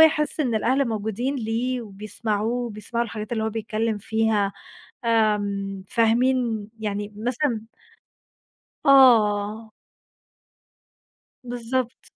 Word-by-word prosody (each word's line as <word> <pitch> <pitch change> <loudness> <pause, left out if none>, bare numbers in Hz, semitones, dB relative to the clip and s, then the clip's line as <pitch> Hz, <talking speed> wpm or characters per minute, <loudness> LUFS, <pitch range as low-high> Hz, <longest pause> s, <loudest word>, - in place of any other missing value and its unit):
يحس 310 -1 +4
إن 245 -6 +1
الأهل 260 +4 +2
موجودين 220 +5 -2
ليه 240 +2 -1
وبيسمعوه 215 +1 -3
وبيسمعوا 230 +2 -3
الحاجات 215 -1 -6
اللي 220 -2 0
هو 220 - -1
بيتكلم 220 0 -2
فيها 220 -1 +1 0.5
آمم، 205 -4 +1
فاهمين 230 -1 +2
يعني 205 -1 -3
مثلًا 240 0 -1 1.2
آه. 220 -5 +5 1.7
بالضبط. 245 +1 -3
225 Hz, 90 wpm, -24 LUFS, 210-245 Hz, 1.7 s, آه